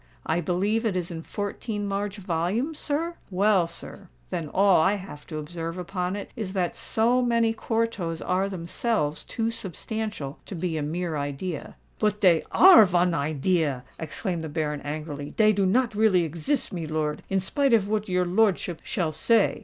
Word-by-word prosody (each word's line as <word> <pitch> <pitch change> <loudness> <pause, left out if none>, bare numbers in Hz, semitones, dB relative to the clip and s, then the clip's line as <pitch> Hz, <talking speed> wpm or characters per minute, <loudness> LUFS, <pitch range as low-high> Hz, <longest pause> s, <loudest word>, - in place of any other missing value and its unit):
I 170 - +1
believe 200 +7 0
it 215 -5 0
is 180 -1 -2
in 165 -1 -5
fourteen 205 +3 -4
large 200 +1 -2
volumes, 195 - -1
sir? 330 +4 -2
Well, 195 -2 +3
sir—then 170 -1 -7
all 195 0 +5
I 195 +6 +3
have 185 -7 -9
to 155 - -5
observe 165 +2 -5
upon 180 +1 -3
it 205 - -6
is 210 -6 -4
that 180 -3 -1
so 240 +3 +2
many 230 -2 +2
quartos 225 -8 -2
are 190 +2 0
themselves 170 -2 -1
too 230 -1 -2
substantial 215 -7 -4
to 195 - -6
be 170 -1 -2
a 155 - -1
mere 160 +2 -2
idea." 145 +4 -4 0.2
"But 210 -1 +1
dey 175 -5 +5
are 365 -9 +9
von 180 -2 +2
idea!" 150 -2 0 0.2
exclaimed 170 +2 -3
the 160 - -4
Baron, 150 -1 -2
angrily. 145 -1 -5
"Dey 215 -1 +5
do 195 -1 +2
not 240 +4 +2
really 205 -4 +4
exist, 170 - -2
milor—in 155 +2 -2
spite 275 +9 0
of 205 -3 +1
what 210 -1 -1
your 180 0 +2
lordship 185 -3 +1
shall 180 -10 -1
say. 215 +8 +2
185 Hz, 165 wpm, -26 LUFS, 165-215 Hz, 0.2 s, are